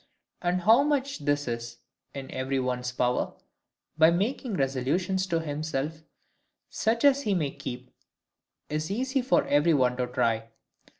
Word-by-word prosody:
And 180 0 0
how 225 +8 +6
much 280 -2 0
this 145 -1 0
is 120 0 -4 0.4
in 135 -1 -7
every 130 +1 -1
one's 125 -1 -2
power, 125 0 0 0.6
by 160 0 +8
making 205 +6 -1
resolutions 150 +8 0
to 165 -3 0
himself, 155 0 -3 0.7
such 230 +4 +1
as 280 0 +5
he 210 -6 0
may 150 -6 0
keep, 125 -3 -7 0.8
is 155 +1 -3
easy 260 +6 0
for 255 - +2
every 150 +3 +3
one 125 -2 +2
to 125 -1 -1
try. 115 -2 0
150 Hz, 140 wpm, -27 LUFS, 130-195 Hz, 0.8 s, by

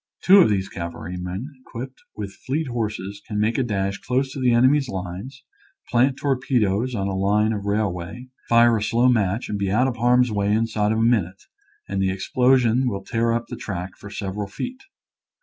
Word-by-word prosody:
Two 195 +2 +8
of 180 - +6
these 100 -2 0
cavalrymen 90 - -5
equipped 130 +1 -8
with 100 -2 -6
fleet 150 +5 -3
horses 105 -4 -4
can 105 -2 -2
make 110 +4 +1
a - - +2
dash 100 -4 -2
close 130 +1 -1
to 140 - -6
the 125 -2 +3
enemy's 130 +3 +4
lines, 95 +7 -6 0.5
plant 130 +3 +3
torpedoes 125 -4 0
on 100 -2 -1
a 95 - -2
line 105 +3 +2
of 100 -1 -4
rail 105 -2 +1
way, 95 +9 -8 0.2
fire 115 0 +5
a - - -3
slow 120 +3 +2
match 110 -2 +1
and 105 -1 -3
be 100 -1 0
out 115 +7 +3
of 125 -2 -3
harm's 125 +1 +3
way 100 -1 0
inside 110 -1 +1
of 110 - +1
a - - +1
minute, 100 -6 +1 0.4
and 100 0 -2
the 95 - +2
explosion 125 +5 +2
will 100 -4 -3
tear 115 +3 0
up 115 0 -1
the - - -7
track 90 -2 -5
for 100 - -11
several 100 0 -4
feet. 255 - -6
110 Hz, 195 wpm, -23 LUFS, 100-125 Hz, 0.5 s, Two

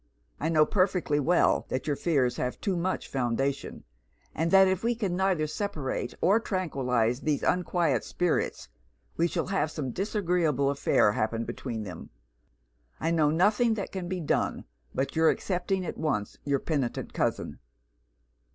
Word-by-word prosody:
I 160 - 0
know 155 -2 +5
perfectly 180 -6 +1
well 170 +5 +2
that 130 - -2
your 145 - 0
fears 135 -7 +1
have 125 - -2
too 195 -3 -1
much 180 +2 -2
foundation; 135 +2 -2 0.5
and 165 +2 0
that 190 +1 +7
if 190 +1 0
we 235 +1 +1
can 200 -6 -2
neither 185 -4 +1
separate 150 - -3
or 200 +6 +4
tranquillise 130 - 0
these 150 -2 0
unquiet 170 -7 +1
spirits, 175 - -1 0.5
we 170 - +2
shall - - -2
have 185 -5 0
some 145 -5 -4
disagreeable 175 - +1
affair 140 -6 +3
happen 115 +2 -1
between 120 -2 -5
them. 90 -5 -8 0.9
I 165 - 0
know 155 -3 +3
nothing 210 +8 +3
that 200 - -4
can 185 -2 -4
be 185 0 -3
done 160 - -1 0.3
but 135 +4 -2
your 160 0 +5
accepting 185 0 -1
at - - -5
once 105 -10 -1
your 140 -1 +1
penitent 135 -4 -2
cousin.' - - -2
160 Hz, 150 wpm, -28 LUFS, 135-185 Hz, 0.9 s, that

